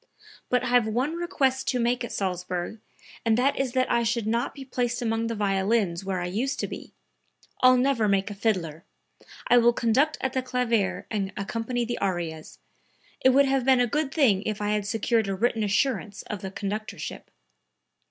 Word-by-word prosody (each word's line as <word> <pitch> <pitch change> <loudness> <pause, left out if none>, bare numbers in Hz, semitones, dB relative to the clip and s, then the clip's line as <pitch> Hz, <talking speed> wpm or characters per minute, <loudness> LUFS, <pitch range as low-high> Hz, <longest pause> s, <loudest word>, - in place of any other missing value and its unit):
But 250 0 +2
I - - -1
have 245 -2 +4
one 250 +8 0
request 275 -7 0
to 250 - +1
make 240 +1 +1
at 235 - -5
Salzburg, 180 +1 -3 0.4
and 225 -1 +2
that 265 +3 +2
is 265 -2 -1
that 255 -1 +1
I 235 - +3
shall 235 0 0
not 230 +2 -1
be 275 -1 -8
placed 245 -2 -1
among 225 -1 -1
the 230 - -3
violins 195 -2 0
where 190 -1 -2
I 175 - -2
used 230 +10 -2
to - - -2
be; - - -9 0.7
I'll 255 0 +7
never 250 -4 +2
make 195 0 +1
a - - -4
fiddler. 185 -7 -1 0.6
I 245 - +6
will 240 0 +5
conduct 260 +7 +2
at 265 -1 -2
the 260 - 0
clavier 245 -5 0
and 200 -3 -2
accompany 230 +4 -2
the 240 +1 -3
arias. 170 -5 -3 0.7
It 260 - +7
would 275 +2 +5
have 270 -1 +1
been 260 0 +4
a 245 - +4
good 285 +4 -1
thing 240 - +3
if 215 0 -3
I 205 0 -1
had 210 -1 0
secured 225 +1 +1
a 195 - -1
written 225 +2 0
assurance 210 0 0
of 210 -3 -6
the 190 - -4
conductorship." 210 +2 -5
230 Hz, 190 wpm, -26 LUFS, 200-255 Hz, 0.7 s, I'll